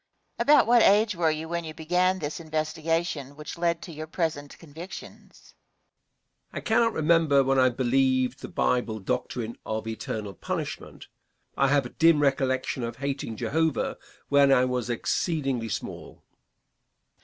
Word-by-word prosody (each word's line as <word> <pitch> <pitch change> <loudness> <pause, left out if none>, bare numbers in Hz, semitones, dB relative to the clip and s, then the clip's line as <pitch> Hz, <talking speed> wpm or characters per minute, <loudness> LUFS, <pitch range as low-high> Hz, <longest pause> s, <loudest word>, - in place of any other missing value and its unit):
Question. - - +3
About - - +5
what 240 0 +6
age 210 0 +4
were 165 -2 +2
you 155 +1 -3
when 170 +1 -3
you 155 -1 -8
began 180 +4 +1
this 150 -2 -4
investigation 160 -2 -2
which 150 0 -8
led 170 -1 -1
to 175 - -8
your 155 0 -7
present 155 -4 -3
convictions? 165 +4 -11 1.0
Answer. - - -8
I - - 0
cannot 230 0 +2
remember 155 -3 +3
when 135 0 +2
I 130 0 +5
believed 130 +1 +1
the - - -6
Bible 120 -3 0
doctrine 115 +3 -3
of 110 0 -4
eternal 110 -2 -5
punishment. - - -6 0.5
I 135 - +3
have 140 -1 +2
a - - -6
dim 165 +1 +4
recollection 135 -2 0
of 115 -1 -4
hating 140 -5 -4
Jehovah 160 +3 0 0.3
when 140 -1 +5
I 130 -1 +5
was 125 -2 -2
exceedingly 135 -1 -1
small. - - -6
145 Hz, 150 wpm, -26 LUFS, 130-165 Hz, 1.0 s, what